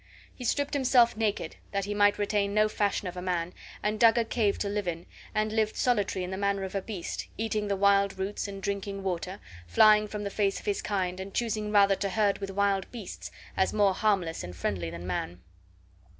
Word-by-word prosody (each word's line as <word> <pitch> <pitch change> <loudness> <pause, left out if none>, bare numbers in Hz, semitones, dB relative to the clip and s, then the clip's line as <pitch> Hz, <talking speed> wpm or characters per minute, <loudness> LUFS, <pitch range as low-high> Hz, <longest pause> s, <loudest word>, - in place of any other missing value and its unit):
He 250 - -8
stripped 285 +4 0
himself 250 -4 +4
naked, 215 -2 -2 0.2
that 200 -1 0
he 205 - -3
might 205 0 +4
retain 205 -1 0
no 215 0 +5
fashion 205 -2 -1
of 180 - -6
a 180 - -5
man, 180 -1 -2 0.3
and 210 +1 0
dug 230 +1 +6
a 235 - +2
cave 220 -3 +1
to 205 - -2
live 205 -1 -2
in, 170 0 -3 0.3
and 215 0 +1
lived 220 -1 +1
solitary 205 -6 +1
in 180 - -6
the 190 - -4
manner 200 -1 0
of 190 - -5
a 195 - -1
beast, 190 -3 -5
eating 215 -1 -1
the 200 - 0
wild 200 0 +3
roots 195 +2 -3
and 195 -1 -8
drinking 200 -1 -3
water, 185 +1 -3 0.3
flying 210 - +6
from 210 0 -5
the 200 - -3
face 200 -1 0
of - - -15
his 205 -2 0
kind, 185 -3 -2
and 190 +1 -7
choosing 215 -3 -1
rather 200 -1 +5
to 200 - -1
herd 205 0 +1
with 195 -1 -4
wild 195 -1 0
beasts, 175 - -7 0.3
as 190 - +1
more 205 -2 +4
harmless 185 -5 0
and 90 0 -7
friendly 90 -1 -2
than 85 +1 -8
man. 90 -1 -3
200 Hz, 215 wpm, -28 LUFS, 190-215 Hz, 0.3 s, dug